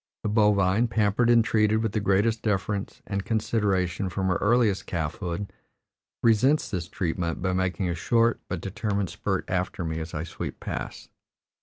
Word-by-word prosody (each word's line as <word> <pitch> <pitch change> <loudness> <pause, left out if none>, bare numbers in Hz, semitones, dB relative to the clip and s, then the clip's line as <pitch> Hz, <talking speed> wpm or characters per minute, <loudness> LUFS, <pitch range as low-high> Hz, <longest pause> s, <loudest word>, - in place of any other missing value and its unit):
The 105 - 0
bovine, 105 0 +3
pampered 110 +1 +2
and 115 -2 +5
treated 110 0 +2
with 110 - 0
the 110 - 0
greatest 105 +3 +2
deference 105 -1 -2
and 100 -1 -3
consideration 100 -4 0
from 95 +1 -1
her 90 - +2
earliest 110 -2 +2
calfhood, 85 +4 -3 0.7
resents 120 +7 +3
this 90 -5 -3
treatment 85 -2 -2
by 95 0 -1
making 95 0 0
a 85 - 0
short 115 +7 +2
but 95 -3 -4
determined 100 -1 -2
spurt - - -2
after 90 0 -2
me 80 0 -2
as 80 0 -6
I 75 - -2
sweep 85 - -6
past. - - -6
100 Hz, 160 wpm, -26 LUFS, 90-110 Hz, 0.7 s, and